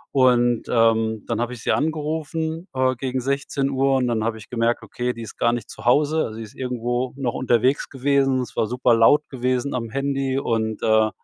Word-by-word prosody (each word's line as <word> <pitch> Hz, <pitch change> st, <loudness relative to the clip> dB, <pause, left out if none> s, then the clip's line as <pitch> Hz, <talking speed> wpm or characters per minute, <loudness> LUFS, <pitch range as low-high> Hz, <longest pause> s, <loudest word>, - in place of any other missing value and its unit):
und, 120 Hz, -3 st, +3 dB
ähm, 115 Hz, -2 st, +2 dB
dann 115 Hz, -1 st, -1 dB
habe 120 Hz, +1 st, -2 dB
ich 115 Hz, -, -10 dB
sie -, -, +1 dB
angerufen, 160 Hz, +2 st, -2 dB
äh, 130 Hz, 0 st, +2 dB
gegen 130 Hz, +1 st, -3 dB
16:00. 135 Hz, 0 st, 0 dB
Und 125 Hz, -1 st, +1 dB
dann 115 Hz, -2 st, 0 dB
habe 115 Hz, 0 st, -1 dB
ich 105 Hz, -, -12 dB
gemerkt: 120 Hz, 0 st, 0 dB
„Okay, 125 Hz, 0 st, -3 dB
die 115 Hz, -, -8 dB
ist 110 Hz, -, -10 dB
gar 120 Hz, 0 st, +2 dB
nicht 120 Hz, -, -5 dB
zu -, -, -11 dB
Hause.“ 150 Hz, +5 st, +3 dB
Also, 110 Hz, -, -7 dB
sie 115 Hz, -, -6 dB
ist 105 Hz, -, -12 dB
irgendwo 125 Hz, 0 st, -2 dB
noch 125 Hz, -4 st, -2 dB
unterwegs 125 Hz, +2 st, +1 dB
gewesen. 135 Hz, -1 st, +1 dB
Es 125 Hz, -, -7 dB
war 110 Hz, -, +1 dB
super 125 Hz, 0 st, +2 dB
laut 130 Hz, +7 st, +4 dB
gewesen 130 Hz, +1 st, -1 dB
am 115 Hz, -2 st, -3 dB
Handy 135 Hz, +1 st, -1 dB
und, 110 Hz, -4 st, -2 dB
äh, 110 Hz, 0 st, +4 dB
125 Hz, 205 wpm, -22 LUFS, 115-135 Hz, -, laut